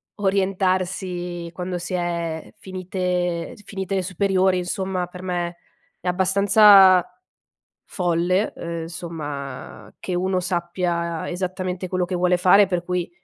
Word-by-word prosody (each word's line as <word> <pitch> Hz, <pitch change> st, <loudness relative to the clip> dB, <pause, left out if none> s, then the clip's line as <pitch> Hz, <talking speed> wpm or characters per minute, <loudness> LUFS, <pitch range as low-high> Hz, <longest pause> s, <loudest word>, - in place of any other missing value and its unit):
orientarsi 185 Hz, -3 st, -1 dB
quando 180 Hz, 0 st, -4 dB
si 175 Hz, +2 st, -6 dB
è 170 Hz, -2 st, -3 dB
finite 180 Hz, -2 st, -2 dB
eg -, -, -13 dB
finite 195 Hz, 0 st, -3 dB
e -, -, +1 dB
superiori, 190 Hz, 0 st, +1 dB
insomma. 185 Hz, 0 st, -2 dB
Per 180 Hz, 0 st, -10 dB
me 175 Hz, -2 st, -3 dB, 0.4 s
è 180 Hz, -, -8 dB
abbastanza 190 Hz, 0 st, +6 dB, 0.8 s
folle, 180 Hz, +2 st, 0 dB
uhm, 170 Hz, -1 st, -5 dB
somma, 150 Hz, -5 st, -7 dB
che 185 Hz, -, -3 dB
uno 185 Hz, +1 st, 0 dB
sappia 175 Hz, -1 st, -2 dB
esattamente 185 Hz, 0 st, -3 dB
quello 185 Hz, 0 st, 0 dB
che 185 Hz, -, -4 dB
vuole 180 Hz, 0 st, +3 dB
fare, 190 Hz, +3 st, +6 dB
per 180 Hz, -2 st, -1 dB
cui 180 Hz, -1 st, -2 dB
180 Hz, 120 wpm, -23 LUFS, 175-190 Hz, 0.8 s, abbastanza